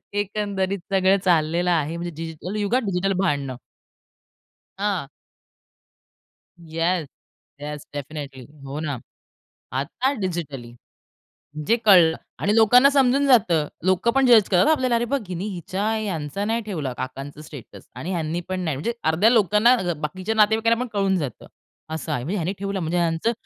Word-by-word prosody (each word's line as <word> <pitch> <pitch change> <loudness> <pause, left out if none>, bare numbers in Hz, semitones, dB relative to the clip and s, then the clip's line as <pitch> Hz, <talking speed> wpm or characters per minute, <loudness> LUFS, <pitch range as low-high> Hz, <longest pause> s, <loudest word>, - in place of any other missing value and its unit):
एकंदरीत 200 -1 -1
सगळं 190 0 +4
चाललेलं 170 0 +2
आहे, 165 -1 0
म्हणजे 175 +1 -4
डिजिटल 165 +4 -6
युगात, 235 +6 +1
डिजिटल 195 0 0
भांडणं. 140 -8 -1 1.2
हां. 195 -7 -1 1.5
येस, 165 0 -1 0.5
येस 150 0 -6
डेफिनेटली 140 -2 -7 0.2
हो 140 +2 -6
ना. 150 -4 -3 0.7
आता 145 - -1
डिजिटली. 150 - -4 0.9
जे 230 - +5
कळलं 175 -6 +7 0.2
आणि 205 +1 +1
लोकांना 245 +5 +6
समजून 275 0 +3
जातं. 180 - +4 0.2
लोकंपण 235 +9 +2
जज 230 -5 +6
करतात 180 +8 +4
आपल्याला. 260 -5 +2
अरे 235 +1 +1
बघ, 280 +4 0
हिनी 180 +1 -4
हिच्या 185 0 -4
ह्यांचा 195 -3 -3
नाही 225 +2 0
ठेवला 155 -11 -3
काकांचं 140 +3 -6
स्टेटस 150 -5 -12
आणि 180 - -5
ह्यांनीपण 175 +2 -3
नाही. 160 -5 -2
म्हणजे 230 - -2 0.2
अर्ध्या 185 +8 +4
लोकांना 220 +1 +4
अ, 180 -7 -1
बाकीच्या 185 +8 -4
नातेवाईकांना 220 +2 +3
पण 250 - -2
कळून 195 -2 +1
जातं, 145 -7 -5 0.4
असं 160 -3 -4
आहे. 120 - -2
म्हणजे 175 +10 -3
ह्यांनी 180 +1 -1
ठेवलं 195 0 -3
म्हणजे 170 0 -1
ह्यांचं 170 +5 +1
185 Hz, 140 wpm, -23 LUFS, 155-210 Hz, 1.5 s, कळलं